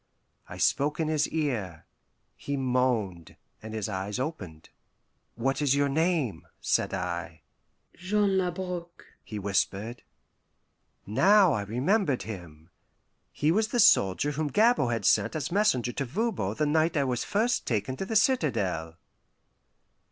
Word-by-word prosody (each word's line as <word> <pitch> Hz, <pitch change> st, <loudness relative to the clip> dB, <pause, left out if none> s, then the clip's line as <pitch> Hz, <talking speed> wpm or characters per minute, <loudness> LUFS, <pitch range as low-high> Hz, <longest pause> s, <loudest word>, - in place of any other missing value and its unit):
I -, -, -8 dB
spoke 150 Hz, +3 st, +1 dB
in 160 Hz, -1 st, 0 dB
his 155 Hz, -1 st, +1 dB
ear. 110 Hz, -, -3 dB, 0.5 s
He 140 Hz, 0 st, -4 dB
moaned, 125 Hz, -, -1 dB, 0.3 s
and 110 Hz, 0 st, -7 dB
his 110 Hz, -3 st, -2 dB
eyes 100 Hz, +1 st, -4 dB
opened. 90 Hz, -, -6 dB, 0.6 s
"What 135 Hz, +5 st, -1 dB
is 140 Hz, -2 st, +3 dB
your 140 Hz, 0 st, +2 dB
name?" 155 Hz, -, 0 dB
said -, -, 0 dB
I. 85 Hz, -3 st, -4 dB, 0.5 s
"Jean 195 Hz, +1 st, +1 dB
Labrouk," 180 Hz, -1 st, -4 dB, 0.2 s
he 105 Hz, -, -7 dB
whispered. 100 Hz, +3 st, -2 dB, 1.0 s
Now 190 Hz, -, +5 dB
I 110 Hz, -, -1 dB
remembered 135 Hz, -, 0 dB
him. 85 Hz, -6 st, -10 dB, 0.6 s
He 150 Hz, +2 st, +1 dB
was 215 Hz, +5 st, +2 dB
the 240 Hz, +2 st, -1 dB
soldier 130 Hz, -, +4 dB
whom 150 Hz, +1 st, -2 dB
Gabord 215 Hz, -, +3 dB
had 115 Hz, -, -2 dB
sent -, -, +3 dB
as 155 Hz, +1 st, -3 dB
messenger 170 Hz, -, +2 dB
to 140 Hz, -, -3 dB
Voban 150 Hz, -, -2 dB
the 150 Hz, -, 0 dB
night 160 Hz, +2 st, +1 dB
I 140 Hz, -, +3 dB
was 125 Hz, -3 st, -1 dB
first 225 Hz, +4 st, 0 dB
taken 110 Hz, +2 st, -1 dB
to 195 Hz, -, -3 dB
the 225 Hz, -, -3 dB
citadel. 110 Hz, -, +1 dB
135 Hz, 135 wpm, -28 LUFS, 105-170 Hz, 1.0 s, Now